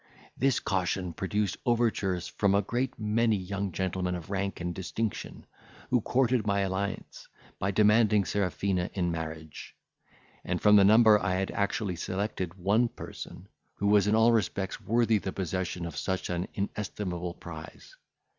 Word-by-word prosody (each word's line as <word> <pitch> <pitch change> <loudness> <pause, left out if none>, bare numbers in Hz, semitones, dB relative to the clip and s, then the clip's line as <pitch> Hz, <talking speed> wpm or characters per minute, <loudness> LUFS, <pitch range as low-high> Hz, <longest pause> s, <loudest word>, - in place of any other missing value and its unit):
This 135 0 +2
caution 90 -2 -1
produced 100 +3 -1
overtures 110 -7 +1
from 100 -1 +1
a 100 - +3
great 125 +6 -2
many 110 +1 +2
young 100 0 -3
gentlemen 90 0 -2
of 85 +2 -8
rank 100 0 -2
and 85 0 -3
distinction, 100 +4 -4 0.5
who 125 -2 +3
courted 125 0 +2
my 100 0 +2
alliance, 95 +1 -3 0.3
by 100 - 0
demanding 105 0 +4
Serafina 95 -2 -1
in 90 -3 0
marriage; 80 -1 -7 0.7
and 90 0 -2
from 105 0 +6
the 100 - +7
number 110 +1 +7
I 100 -2 0
had 95 +1 -1
actually 100 -2 -1
selected 95 -1 -3
one 100 +6 +2
person, - - -9 0.3
who 100 - -3
was 105 -1 +5
in 105 - +3
all 110 +1 +5
respects 100 -3 -1
worthy 115 -1 +2
the 95 - -4
possession 90 -1 -3
of 85 -3 -6
such 95 +5 -2
an 90 +1 -2
inestimable 90 -3 -3
prize. - - -10
100 Hz, 150 wpm, -29 LUFS, 90-105 Hz, 0.7 s, the